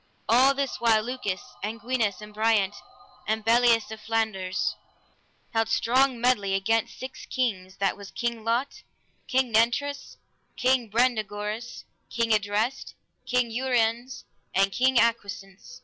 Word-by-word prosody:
All 260 +4 +5
this 275 -1 -2
while 225 -2 +4
Lucas, 240 -6 -3 0.2
and 220 +3 -4
Gwinas, 230 -3 -1
and 210 0 -11
Briant, 215 -2 +2 0.5
and 220 0 -1
Bellias 230 -1 +4
of 220 -1 -8
Flanders, 215 -4 -1 0.8
held 225 -1 +1
strong 255 +1 +2
medley 210 -6 +2
against 225 +4 0
six 260 0 -8
kings, 190 -7 -2
that 195 -1 0
was 200 -1 -11
King 235 0 -3
Lot, 235 +5 -1 0.5
King 255 -2 +1
Nentres, 240 +6 0 0.4
King 255 -3 +2
Brandegoris, 220 0 -1 0.3
King 230 -1 -1
Idres, 215 +5 -1 0.3
King 245 -2 +1
Uriens, 245 0 0 0.3
and 195 +1 +3
King 260 +4 +2
Agwisance. 225 -1 -1
230 Hz, 125 wpm, -26 LUFS, 210-250 Hz, 0.8 s, All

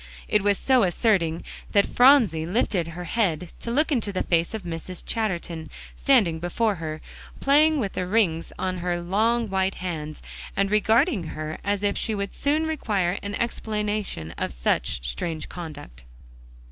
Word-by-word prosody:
It 210 - +3
was 200 0 +2
so 260 -2 +3
asserting 175 -4 +1 0.3
that 200 -1 +5
Phronsie 240 - +5
lifted 180 -3 0
her 170 +2 -6
head 175 -4 -1
to - - -5
look 300 +7 +1
into 230 -7 0
the 185 - -1
face 170 +5 +1
of 215 - -5
Mrs. 170 +1 -6
Chatterton, 170 -8 -3 0.3
standing 210 - +3
before 205 +6 0
her, 155 -1 -5 0.4
playing 300 +2 +4
with 200 -6 -2
the 180 - -2
rings 180 -6 +1
on 185 -1 -2
her 175 0 -1
long 220 +6 +1
white 190 -1 0
hands, 155 -4 -5 0.3
and 195 0 +1
regarding 220 - +3
her 155 0 -4
as 200 0 -1
if 200 0 +1
she 220 - -1
would 200 -1 -3
soon 300 +3 +1
require 205 - 0
an 205 0 -4
explanation 210 - -2
of - - -1
such - - -1
strange 155 - -3
conduct. 150 - -9
195 Hz, 160 wpm, -25 LUFS, 165-225 Hz, 0.4 s, that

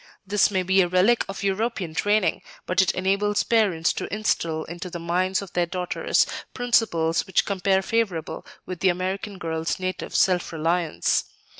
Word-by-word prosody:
This 200 +1 +3
may 190 -2 0
be 190 +1 +4
a 180 - +2
relic 185 +7 +3
of 195 - -6
European 195 -3 -1
training, 205 -1 +1 0.2
but 185 +1 +2
it 190 - +2
enables 200 +2 +1
parents 195 -8 +2
to - - -5
instil 165 -7 -1
into 175 +2 -7
the 175 - -6
minds 185 +3 0
of 195 - -12
their 175 -1 +1
daughters 180 0 0 0.3
principles 220 -10 +1
which 190 - +2
compare 195 -1 +1
favorable 200 -7 -2 0.2
with 185 -2 -6
the 190 - +3
American 190 +3 -3
girl's 165 -1 -3
native 185 0 -4
self 180 -2 +2
reliance. 165 +1 0
185 Hz, 160 wpm, -24 LUFS, 175-200 Hz, 0.3 s, be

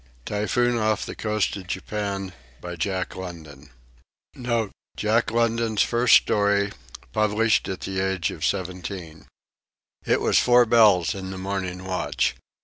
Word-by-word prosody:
TYPHOON 120 +4 0
OFF 110 -2 0
THE - - -6
COAST 105 -2 -1
OF 95 -2 -10
JAPAN 100 0 -4 0.5
[Jack 95 +1 -2
London's 80 -6 -9 2.1
first 120 0 +4
story, 100 -1 +3 0.4
published 110 +2 +2
at 95 - -5
the 95 -1 -3
age 95 -2 0
of 80 - -8
seventeen] 90 -3 -4 0.8
It - - +2
was - - +3
four 125 0 +5
bells 110 -7 +5
in 95 -1 -6
the 95 - -6
morning 95 -1 -4
watch. 95 -1 -1
95 Hz, 115 wpm, -24 LUFS, 90-105 Hz, 2.1 s, four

